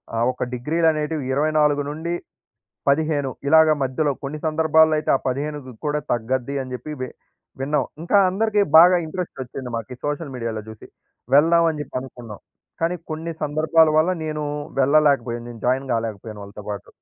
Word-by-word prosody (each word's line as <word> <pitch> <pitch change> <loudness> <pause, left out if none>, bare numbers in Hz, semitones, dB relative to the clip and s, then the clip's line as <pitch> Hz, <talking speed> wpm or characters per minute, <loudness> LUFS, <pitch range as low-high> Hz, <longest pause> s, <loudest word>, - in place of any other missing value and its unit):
ఆ - - -1
ఒక 125 - -4
డిగ్రీలనేటివి 155 +3 0
24-15 150 0 -1 0.2
ఇలాగ 160 +1 +6
మధ్యలో 135 +3 0
కొన్ని 145 +2 -5
సందర్భాల్లో 160 0 +4
అయితే 150 - -1
ఆ - - -5
15 140 0 -4
కూడా 150 0 0
తగ్గద్ది 125 +3 -1
అని 130 -1 -8
చెప్పి 125 +5 -6
వి 130 - -3 0.5
విన్నాం. 145 +3 +1 0.2
ఇంకా 190 +4 +3
అందరికి 210 +2 +1 0.2
బాగా 180 +2 +8
ఇంట్రెస్టొచ్చింది, 135 -7 -6
మాకీ 120 +3 -6
సోషల్ 145 -1 -3
మీడియాలో 115 -3 -4
జూసి. 110 -1 -11 0.5
వెళ్దామని 165 0 +4
జెప్పి 140 - -8
అనుకున్నాం. 120 -5 -10 0.4
కానీ 170 +2 +1 0.2
కొన్ని 160 +1 -5
సందర్భాల 155 +2 +3
వల్ల 160 +4 +3
నేనూ 155 -1 -3 0.3
వెళ్ళలేకబోయాను. 135 -4 +2
నేను 115 -2 -11
జాయిన్ 130 +1 0
గాలేకపోయాను 110 -2 -4
వాళ్ళతో 100 +1 -11
పాటు. 100 -2 -6
145 Hz, 140 wpm, -22 LUFS, 130-160 Hz, 0.5 s, బాగా